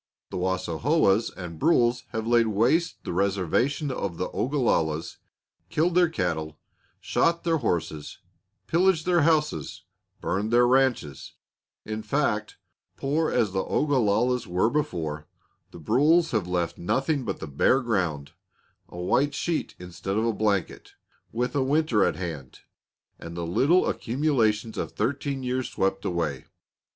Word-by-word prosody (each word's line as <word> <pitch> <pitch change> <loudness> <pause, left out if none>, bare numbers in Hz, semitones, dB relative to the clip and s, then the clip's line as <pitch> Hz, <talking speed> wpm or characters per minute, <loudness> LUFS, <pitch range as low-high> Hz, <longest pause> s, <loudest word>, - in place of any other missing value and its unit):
The - - -4
Wassaohas 95 - +1
and 85 -4 -7
Brules 125 -6 +2
have 110 -1 -4
laid 120 -1 +3
waste 120 - +1
the - - -4
reservation 100 - 0
of 100 -9 -4
the 90 - -2
Ogalallas, 100 - 0 0.5
killed 170 +3 +1
their 175 -1 +4
cattle, 80 - -2 0.4
shot 170 0 +1
their 165 -1 +2
horses, 85 - -3 0.5
pillaged 175 -1 +2
their 175 -2 +3
houses, 155 0 0 0.4
burned 100 +5 -1
their 120 +1 +5
ranches; 125 - +1 0.5
in 110 0 -4
fact, 110 -5 -1 0.4
poor 155 +4 0
as 115 -6 +1
the 95 0 -1
Ogalallas 125 -3 +1
were 90 +6 +1
before, 80 - -2 0.4
the - - -12
Brules 150 - +3
have 105 -6 0
left 90 -2 -2
nothing 135 - 0
but 100 -5 -4
the - - -5
bare 75 - +2
ground, 90 -11 -1 0.6
a - - -11
white 135 +11 +1
sheet 165 +3 -2
instead 90 +3 -5
of 110 - +1
a 115 - +1
blanket, 105 -4 -1 0.4
with 125 +4 -2
a 140 - +2
winter 135 -6 +2
at - - +1
hand, 80 -8 -7 0.6
and 85 +1 -8
the 85 - -3
little 145 - +3
accumulations 115 -5 0
of - - -4
thirteen 135 +4 -2
years 125 0 -2
swept 95 0 -1
away. 80 -7 -2
115 Hz, 140 wpm, -26 LUFS, 90-140 Hz, 0.6 s, their